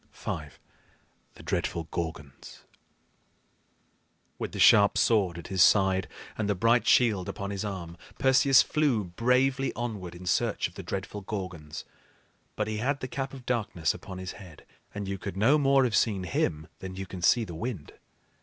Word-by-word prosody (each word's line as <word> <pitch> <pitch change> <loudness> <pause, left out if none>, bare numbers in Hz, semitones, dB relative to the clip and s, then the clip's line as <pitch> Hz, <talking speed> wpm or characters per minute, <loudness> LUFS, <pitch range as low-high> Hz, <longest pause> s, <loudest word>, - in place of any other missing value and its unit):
V. - - -5 1.0
THE - - -13
DREADFUL 85 - -2
GORGONS. 80 -5 -6 1.8
With - - -4
the - - -7
sharp 100 -1 +6
sword 100 -7 +2
at 85 - -9
his 95 -2 +1
side 95 -1 +4 0.3
and 110 -2 -2
the 105 - +2
bright 115 +5 +3
shield 105 -7 +3
upon 100 0 -5
his 100 0 -3
arm, 90 -5 -6 0.2
Perseus 135 0 +5
flew 145 -9 +1
bravely 125 +8 +1
onward 105 -8 -5
in 90 +1 -10
search 85 - +1
of - - -18
the - - -7
dreadful 100 +1 -5
Gorgons; 90 -7 -6 0.7
but 105 - -1
he 110 0 -3
had 135 +6 -1
the 130 - -4
Cap 135 +1 -4
of 130 -3 -11
Darkness 100 - 0
upon 95 - -9
his 95 0 -5
head, 90 -6 -13 0.3
and 100 -1 -5
you 95 0 -4
could 95 0 -6
no 135 +9 +4
more 135 -1 +4
have 120 -5 +1
seen 100 -5 +1
him 80 -3 -1
than 95 -1 -7
you 95 0 -5
can 95 -1 -8
see 115 +7 +4
the 90 - -7
wind. 95 - -5
100 Hz, 170 wpm, -28 LUFS, 90-120 Hz, 1.8 s, sharp